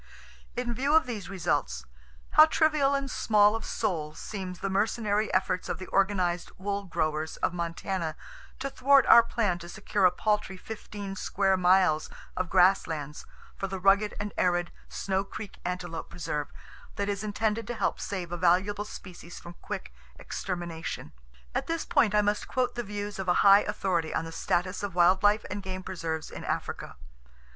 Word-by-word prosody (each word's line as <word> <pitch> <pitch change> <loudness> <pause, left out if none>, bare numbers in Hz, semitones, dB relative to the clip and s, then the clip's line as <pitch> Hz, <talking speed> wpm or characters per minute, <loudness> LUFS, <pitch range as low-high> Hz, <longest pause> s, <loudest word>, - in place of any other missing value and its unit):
In 245 -1 -1
view 275 +5 +1
of 320 - +5
these 220 -7 -5
results, 190 -3 -1 0.5
how 310 - +8
trivial 305 -3 +3
and 275 0 -1
small 210 -1 +4
of 225 - -4
soul 160 -8 -2
seems 185 -3 -6
the 195 - -3
mercenary 210 +1 0
efforts 185 -1 0
of - - -2
the 185 - -7
organized 185 -3 +1
wool 200 +1 -3
growers 155 -3 -2
of - - 0
Montana 170 -1 -3 0.4
to 275 +1 -4
thwart 270 0 +5
our 235 - +9
plan 210 -6 -1
to 170 0 -9
secure 200 -1 0
a 180 - +6
paltry 210 -1 -1
fifteen 205 -1 -7
square 195 0 +1
miles 180 -3 +3 0.3
of 185 -2 -2
grass 190 +2 +5
lands 150 -2 -6 0.3
for 195 - -3
the 190 0 -5
rugged 200 +2 +3
and 205 0 -4
arid 175 -1 +1 0.2
Snow 195 0 -1
Creek 205 0 -9
Antelope 175 -2 -4
Preserve 150 -4 -3 0.5
that 200 - -2
is 200 0 -2
intended 215 +1 -1
to 240 - -3
help - - -1
save 185 -3 -4
a 175 - -3
valuable 190 +4 +2
species 175 -4 -10
from 170 - -10
quick - - -6 0.2
extermination. 175 -3 -5 0.4
At - - -2
this 330 -1 -2
point 245 -11 +3
I 210 - +4
must 205 0 0
quote 250 -1 0
the 240 - -3
views 205 -2 -5
of 190 - -3
a 175 +3 +3
high 200 +1 +9
authority 185 -6 -1
on 165 - -1
the 165 - -7
status 180 +3 -1
of 200 -3 -4
wild 180 +2 +5
life 210 +1 +3
and 205 +1 -3
game 185 -1 -6
preserves 165 -4 -4
in - - -8
Africa. - - -4
195 Hz, 175 wpm, -28 LUFS, 175-210 Hz, 0.5 s, our